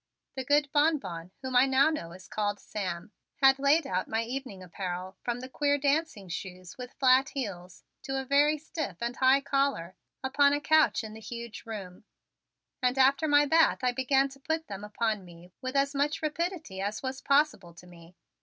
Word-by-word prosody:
The 265 - -3
good 290 +1 +2
Bonbon, 290 - 0
whom 260 -1 -4
I 255 +2 +6
now 270 +3 +4
know 170 - -5
is 185 +1 -12
called 205 -1 -2
Sam, 185 -2 -5 0.2
had 270 0 +5
laid 285 +3 +3
out 185 -4 -2
my 225 +1 -1
evening 240 -6 -6
apparel, 185 +1 -5
from 240 0 -2
the 255 - -7
queer 285 +2 +1
dancing 285 - 0
shoes 180 +1 -7
with 250 0 -9
flat 265 +1 +4
heels 185 -9 -6 0.2
to 270 0 -3
a 265 - -5
very 290 +3 +3
stiff 300 - -5
and 235 +1 -3
high 265 +1 +5
collar, 275 -11 -1 0.3
upon 280 +2 +3
a 290 - +1
couch 310 -3 +3
in 215 -1 -8
the 220 - -10
huge 235 0 -8
room, 195 -5 -7 0.8
and 250 +1 +1
after 275 +3 +4
my 290 0 +5
bath 320 -2 +3
I 250 - +3
began 265 +2 +2
to 275 0 -15
put 320 +3 -2
them 200 0 -7
upon 210 -1 -2
me 175 0 -15
with 255 +1 -4
as 280 +1 +2
much 295 +3 -1
rapidity 315 - -3
as 205 +5 -3
was 260 0 -4
possible 275 - +1
to 175 - -14
me. 175 0 -16
260 Hz, 190 wpm, -29 LUFS, 195-280 Hz, 0.8 s, I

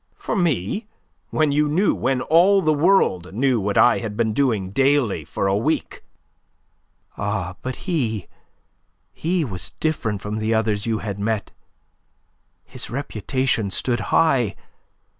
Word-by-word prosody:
"For - - -4
me? 175 - 0 0.4
When 155 -2 +1
you 150 +1 +2
knew 185 +7 +2
when 130 -1 0
all 185 +7 +4
the 155 - +3
world 145 - +2
knew 130 0 +2
what 100 0 -1
I 120 - +5
had 105 -3 -5
been 110 -2 +1
doing 110 -8 0
daily 135 - +2
for 85 - -3
a 95 0 +2
week!" 145 +10 -1 1.2
"Ah, 100 -3 -2
but 130 0 -4
he, 115 - -1 0.9
he 170 0 -1
was 95 -7 -6
different 115 -10 -1
from 105 +2 -4
the 110 +1 0
others 110 -1 0
you 110 -1 +1
had 100 -1 -4
met. 110 0 -2 1.1
His - - -7
reputation 125 -3 -1
stood 120 +5 -1
high. 135 -10 +3
120 Hz, 140 wpm, -22 LUFS, 105-150 Hz, 1.2 s, I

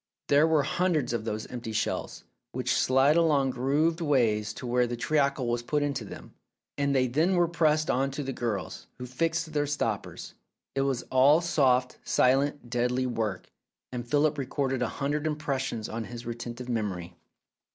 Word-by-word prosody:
There 145 +2 +5
were 155 -3 +3
hundreds 155 -6 0
of 115 -2 -2
those 110 -1 -3
empty 120 -3 -6
shells, - - -2 0.3
which - - 0
slid 135 +3 +4
along 145 -5 +3
grooved 150 +7 +1
ways 115 -8 +2
to - - -7
where 125 0 +2
the 120 0 -4
treacle 140 0 +1
was 120 0 0
put 145 +4 0
into 140 -2 -2
them, - - -10 0.4
and 140 -1 0
they 130 -1 +3
then 155 +9 +1
were 175 -1 +3
passed 155 -2 +2
on 135 +2 +1
to 140 +2 -4
the 135 0 -4
girls, 105 -9 -4
who 125 - -6
fixed 165 +5 -2
their 145 -1 +1
stoppers. 115 -8 -3 0.4
It 135 - 0
was 135 -2 0
all 135 +4 +6
soft, 130 -7 +2
silent, 135 +1 +2
deadly 125 +2 0
work, 110 -6 -3 0.4
and 125 -1 -4
Philip 150 +2 +2
recorded 135 -1 -1
a - - +1
hundred 145 +2 -2
impres 150 -3 -1
sions 115 -4 -3
on 115 0 -4
his 120 +1 -8
retentive 120 +1 -6
memory. 100 -7 -3
135 Hz, 170 wpm, -28 LUFS, 120-150 Hz, 0.4 s, all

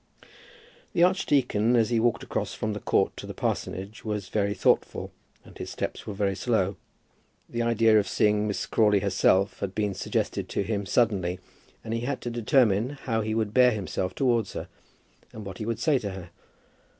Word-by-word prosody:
The 170 - +4
archdeacon, 135 - +2
as 115 0 +2
he 115 - +3
walked 120 0 +1
across - - -3
from 110 0 -2
the 105 - -4
Court - - +1
to - - -7
the - - -7
parsonage, 95 +4 -3
was 105 -3 -3
very 100 -1 0
thoughtful - - +1 0.3
and - - -15
his - - -6
steps - - -5
were 105 - -3
very 100 -1 0
slow. 100 -3 0 0.7
This 120 - -3
idea 115 -2 +4
of 100 - -1
seeing 105 +1 +2
Miss 105 - -2
Crawley 105 -3 +3
herself 95 0 +2
had 95 -1 -4
been 105 -2 0
suggested - - -2
to - - -1
him 100 -1 -2
suddenly, 95 -5 +1 0.4
and 110 - -4
he 115 - 0
had 130 +4 -2
to 120 - -4
determine 120 +1 +2
how 115 -3 0
he 110 0 -2
would 110 -2 -1
bear 125 0 +6
himself 95 -3 -3
towards 120 -6 +1
her, - - -5 0.7
and 110 -2 -8
what 95 -1 -8
he 110 - -4
would 115 -1 -1
say 140 +3 +2
to 105 -4 -4
her. 95 -3 -8
110 Hz, 185 wpm, -27 LUFS, 100-115 Hz, 0.7 s, bear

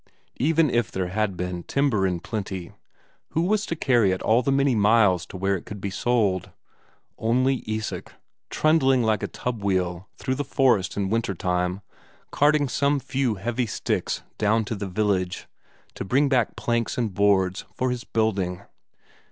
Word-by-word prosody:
Even 155 +2 +3
if 120 -6 +1
there 95 -1 -2
had 100 -1 -1
been 90 0 -3
timber 120 -5 +1
in 90 -2 -2
plenty, 95 -5 -5 0.6
who 165 - +1
was 210 +3 +1
to 165 - -2
carry 120 -9 +3
it 95 0 -1
all 115 +3 +4
the 135 - 0
many 135 -1 +3
miles 105 -5 +3
to 95 - -8
where 95 +1 +1
it 90 - -6
could 105 - -7
be 100 0 -4
sold? 100 -4 0 0.7
Only 130 +3 +1
Isak, 110 0 -4 0.4
trundling 135 -5 +3
like 110 -2 +1
a - - -2
tub 120 -4 -4
wheel 95 0 -1
through 130 - -2
the 145 +2 -2
forest 130 -9 +2
in 100 -1 -1
winter 115 -4 0
time 90 +1 -1 0.5
carting 145 0 +3
some 140 +2 +1
few 130 -3 -1
heavy 120 +5 -2
sticks - - -2 0.2
down 110 +1 +2
to 110 - -3
the 100 -1 -4
village, 95 -2 -1 0.5
to - - -5
bring 135 +9 +2
back 125 -4 +1
planks 115 0 -1
and 115 -5 -1
boards 95 -1 +2
for 130 0 0
his 125 -1 -4
building. 100 -5 -1
110 Hz, 170 wpm, -24 LUFS, 95-130 Hz, 0.7 s, all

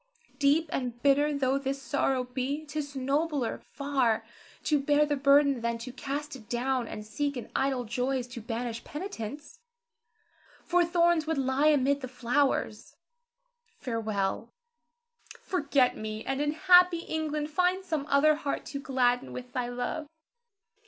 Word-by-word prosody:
Deep 290 +3 +3
and 245 -2 -3
bitter 285 +1 +4
though 275 -1 +1
this 275 0 -3
sorrow 270 -2 0
be, 260 +4 -3
'tis 290 -1 -5
nobler 275 0 -1
far 270 -6 0 0.4
to 300 -2 +2
bear 290 +1 +3
the 295 -1 0
burden 280 -2 +4
than 235 0 -1
to 235 +2 -7
cast 280 +2 -4
it 225 -4 -13
down 245 0 0
and 210 - -7
seek 285 +5 -2
in 240 - -7
idle 265 -2 +1
joys 250 +3 -1
to 240 -1 -9
banish 230 +1 -4
penitence; 300 - -7 1.1
for 355 0 +3
thorns 340 -2 +2
would 320 -2 0
lie 270 +2 +2
amid 285 -1 +3
the 255 - -4
flowers. 245 -3 -1 0.8
Farewell! 220 - -2 0.9
Forget 285 -7 +1
me, 215 0 -5
and 270 +1 -1
in 295 0 0
happy 360 0 +5
England 305 -2 -3
find 365 +3 +1
some 315 -5 -2
other 290 +2 +5
heart 290 -2 -3
to 280 - -3
gladden 255 -2 +1
with 250 0 -8
thy 245 -1 -2
love. 250 +5 -3
275 Hz, 145 wpm, -29 LUFS, 250-300 Hz, 1.1 s, happy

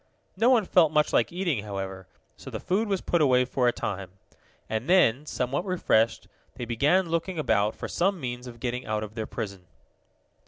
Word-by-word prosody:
No 225 +6 +3
one 235 -6 +4
felt 170 -4 +4
much 150 -1 +2
like - - +3
eating, 170 - -1
however, 95 -2 -6 0.3
so - - -10
the - - -5
food 210 +5 0
was 195 -2 -1
put 170 - +1
away 125 -3 +4
for 125 0 0
a - - +5
time. 100 -5 -4 0.6
And 110 +6 -3
then, 150 -6 +4
somewhat 130 +5 -2
refreshed, 170 - +1 0.3
they 120 - -5
began 150 +10 +2
looking 170 +2 -2
about 105 -8 +1
for - - -6
some 190 +1 0
means 125 -2 -5
of 120 -1 -10
getting 125 0 -3
out 110 0 -1
of 105 0 -8
their 110 -1 -4
prison. 100 -5 -6
125 Hz, 190 wpm, -27 LUFS, 110-175 Hz, 0.6 s, a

